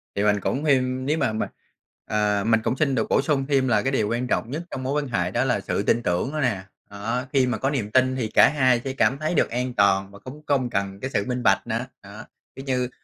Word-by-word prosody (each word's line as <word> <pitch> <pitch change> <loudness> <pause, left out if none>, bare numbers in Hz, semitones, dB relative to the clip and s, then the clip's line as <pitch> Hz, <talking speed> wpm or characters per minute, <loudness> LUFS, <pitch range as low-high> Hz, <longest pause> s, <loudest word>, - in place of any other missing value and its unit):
Thì 100 - 0
mình 105 -1 +3
cũng 145 +4 -2
thêm 130 -2 +1
nếu 150 +3 +1
mà 110 -7 0
mình, 110 - -2 0.6
ờ, 105 -1 0
mình 115 -1 +3
cũng 130 - -1
xin 140 -4 +1
được 110 - -1
bổ - - +3
sung 140 -3 0
thêm 135 -2 +2
là 105 -4 +3
cái 135 - -1
điều 110 -6 0
quan 120 +2 -1
trọng 120 - -1
nhất 160 +4 -4
trong 130 - -5
mối 135 +2 -1
quan - - -6
hệ 115 - -1
đó - - +1
là - - +1
sự - - -2
tin 120 - +1
tưởng 90 +11 0
nữa 155 - -1
nè. 105 -7 0 0.3
Đó, 115 +5 -3
khi 130 -2 +3
mà 120 -3 -1
có 135 - 0
niềm 115 -7 -2
tin 130 +1 +3
thì 120 -4 -2
cả - - +5
hai 130 -5 +2
sẽ 135 -1 -3
cảm 135 0 +2
thấy 155 +3 -2
được - - +2
an 125 +1 -2
toàn 95 -1 +2
và 100 - -13
cũng 145 +4 -10
không 130 -4 +1
cần 100 -2 -3
cái 130 - -4
sự 100 - -1
minh 125 -1 -2
bạch - - +2
nữa, 115 +2 -2 0.2
đó. 100 +3 -11 0.3
Kiểu 135 - -9
như, 125 -2 -1
125 Hz, 270 wpm, -24 LUFS, 105-135 Hz, 0.6 s, cả